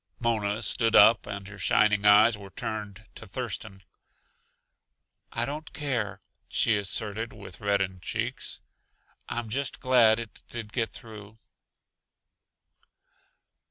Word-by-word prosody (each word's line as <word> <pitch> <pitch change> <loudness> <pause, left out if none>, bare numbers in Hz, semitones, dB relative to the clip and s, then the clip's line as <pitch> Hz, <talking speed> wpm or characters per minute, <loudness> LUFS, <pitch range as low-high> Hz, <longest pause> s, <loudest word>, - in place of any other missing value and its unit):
Mona 110 -2 0
stood 115 0 +1
up, 105 0 +7
and 100 -1 -6
her 100 0 -11
shining 105 -1 +3
eyes 105 +2 +7
were 100 -1 -11
turned 105 +1 -6
to 110 - -11
Thurston. 105 -3 -6 1.5
"I 115 - 0
don't 150 +3 -6
care," 115 -10 -2 0.3
she 115 - +2
asserted 105 +2 -1
with 100 -3 -11
reddened 100 -3 0
cheeks. - - -4 0.7
"I'm 120 -1 -3
just 135 +6 -3
glad 120 -4 +5
it 115 -4 -8
did 115 -2 -7
get 115 -2 0
through." 110 -1 -11
110 Hz, 115 wpm, -27 LUFS, 100-115 Hz, 1.5 s, up